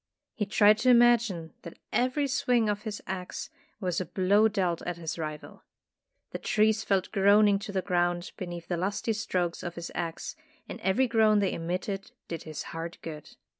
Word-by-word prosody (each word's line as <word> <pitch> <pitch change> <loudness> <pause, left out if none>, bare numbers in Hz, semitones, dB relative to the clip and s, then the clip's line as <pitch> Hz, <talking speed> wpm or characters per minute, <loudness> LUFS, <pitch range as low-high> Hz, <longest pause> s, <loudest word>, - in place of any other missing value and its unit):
He 210 -3 -2
tried 210 0 +5
to 255 - +3
imagine 235 -9 +4
that 170 - -10 0.2
every 255 +4 +1
swing 245 -4 +2
of 205 0 -1
his 210 -2 -5
axe 185 -1 -5 0.3
was 185 -3 -1
a - - -3
blow 200 +5 +3
dealt 185 -5 -1
at 175 -1 -4
his 165 0 -5
rival. 155 -1 -6 0.7
The - - -5
trees 220 0 +2
fell 195 -3 +2
groaning 200 0 +5
to 205 0 -6
the 190 -2 -1
ground 175 -1 0
beneath 175 -2 -6
the 175 - -1
lusty 200 +5 -1
strokes 185 -6 -2
of 175 -1 -5
his 170 0 -6
axe, 165 -2 -4 0.3
and - - -8
every 190 +8 +2
groan 220 -2 +4
they 200 -2 +2
emitted 185 +4 -4
did 165 - -6
his 155 -2 -5
heart 165 +1 -5
good. 155 -2 -7
195 Hz, 175 wpm, -28 LUFS, 175-215 Hz, 0.7 s, tried